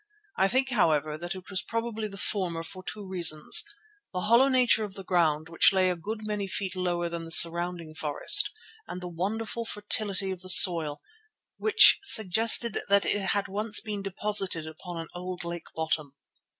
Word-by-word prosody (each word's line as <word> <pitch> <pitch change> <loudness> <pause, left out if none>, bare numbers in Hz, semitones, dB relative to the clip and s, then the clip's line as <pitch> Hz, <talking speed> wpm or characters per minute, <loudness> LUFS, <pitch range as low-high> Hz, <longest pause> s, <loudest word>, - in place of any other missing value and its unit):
I 190 - +1
think, 260 +5 -1
however, 155 - -1
that 175 +4 -7
it 185 -1 -13
was 190 -2 -3
probably 230 -1 -5
the 195 -1 -12
former 180 -5 -3
for 185 +3 -11
two 205 +1 -9
reasons: 170 - +2 0.5
the 180 - -5
hollow 235 +7 +3
nature 250 -4 +1
of 200 -2 -9
the 195 - -10
ground, 160 -4 -1
which 165 0 +2
lay 185 -1 0
a - - -4
good 210 +6 -8
many 210 -2 -5
feet 190 -1 -4
lower 175 -2 -3
than 170 0 -7
the 165 - -12
surrounding 170 0 +4
forest, 155 - +3 0.4
and 180 - -8
the 180 - -9
wonderful 220 +7 -5
fertility 205 -3 -3
of 185 -2 -8
the 185 - -8
soil, 165 -5 +6 0.5
which 435 0 +5
suggested 225 - +4
that 200 0 +2
it 205 - -2
had 200 0 -2
once 210 +2 +2
been 210 -3 -6
deposited 195 -3 -3
upon 165 +3 -10
an 165 0 -8
old 180 0 -8
lake 170 0 -8
bottom. 155 -3 -4
185 Hz, 175 wpm, -25 LUFS, 170-210 Hz, 0.5 s, soil